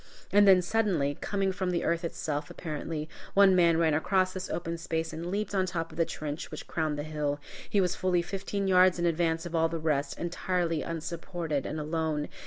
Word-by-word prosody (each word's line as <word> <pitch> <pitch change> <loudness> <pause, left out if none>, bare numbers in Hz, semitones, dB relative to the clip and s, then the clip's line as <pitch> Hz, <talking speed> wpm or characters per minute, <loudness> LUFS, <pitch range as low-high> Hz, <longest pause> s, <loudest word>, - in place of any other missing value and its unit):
And 205 0 +6
then, 185 -2 +7
suddenly, 175 -9 +1
coming 195 -1 0
from 185 -1 -2
the 175 -1 0
earth 170 +1 0
itself, 150 -3 -3
apparently, 155 -1 -4 0.3
one 195 -1 +7
man 170 -2 +5
ran 165 -2 +3
across 185 +4 +2
this 185 0 -5
open 170 -1 -3
space 165 -1 -2
and 170 +2 -5
leaped 205 +2 -2
on 190 -1 +2
top 165 -2 -3
of - - -12
the 165 - +4
trench 150 0 -5
which - - -7
crowned 155 -2 -1
the 145 - -3
hill. 150 -2 -2 0.3
He 205 - +2
was 180 -2 +2
fully 180 -2 +1
fifteen 195 +2 -3
yards 185 -1 +5
in 175 - 0
advance 165 0 +1
of 175 - -6
all 165 0 +3
the 165 - -3
rest, 155 -2 -1
entirely 175 -1 -1
unsupported, 165 -2 -3
and 155 - -3
alone. 155 -1 -1
170 Hz, 200 wpm, -29 LUFS, 155-185 Hz, 0.3 s, then